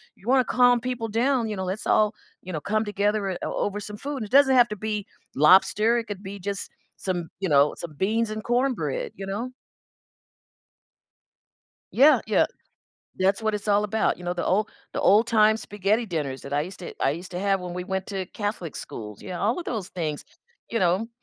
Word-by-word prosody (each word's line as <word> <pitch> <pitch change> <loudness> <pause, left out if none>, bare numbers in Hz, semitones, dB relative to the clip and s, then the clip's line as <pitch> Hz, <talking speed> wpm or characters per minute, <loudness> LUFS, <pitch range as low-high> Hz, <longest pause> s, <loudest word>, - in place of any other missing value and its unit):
you - - -21
wanna 260 -2 +4
calm 245 -1 +4
people 240 -2 -3
down, 235 +1 +1
you 210 - -3
know, 190 - -3
let's 190 +4 -4
all, 215 +1 +3 0.3
you 185 0 -8
know, 155 - -3
come 215 +4 0
together, 205 +1 0
eh, 180 - -3
o - - -2
over 205 0 -3
some 210 +1 -7
food, 280 +5 -5
and - - -2
it 205 - -13
doesn't 265 -2 +5
have 240 -1 +6
to 210 - -5
be 210 0 -3 0.3
lobster, 195 - +5
it 230 - -2
could 205 -1 -6
be 200 +1 -7
just 200 +1 -4 0.3
some 175 -3 -3
you 190 - 0
know, 145 0 +4
some 165 -3 -7
beans 220 +5 +1
and 215 0 -5
cornbread, 270 - 0
you 195 - -5
know? 225 +6 -3 2.4
Yeah, 285 +5 +6
yeah, - - +3 0.7
that's 195 +3 +2
what 220 -1 0
it's 210 - -4
all 205 0 +4
about, 210 -1 0
you 180 - -10
know, 175 0 -1
the 175 - -2
old 205 +3 +1 0.2
the - - -2
old 215 +3 +5
time 220 -1 +4
spaghetti 210 +2 -1
dinners 150 -9 -3
that 140 - -8
I 145 - +2
used 185 +4 -8
to 175 - -7
I - - +3
used 175 +4 -8
to 180 - -4
have 195 0 +1
when 180 -1 -6
we 180 - -3
went 190 +1 -3
to 195 -2 -3
Catholic 205 -6 -4
schools, 105 -2 -8
you 185 - -8
know, 180 - -4
all 225 - +1
of 350 - -5
those 215 - -4
things, 155 -5 -4 0.5
you 230 - 0
know. 185 +4 +1
205 Hz, 215 wpm, -25 LUFS, 185-225 Hz, 2.4 s, have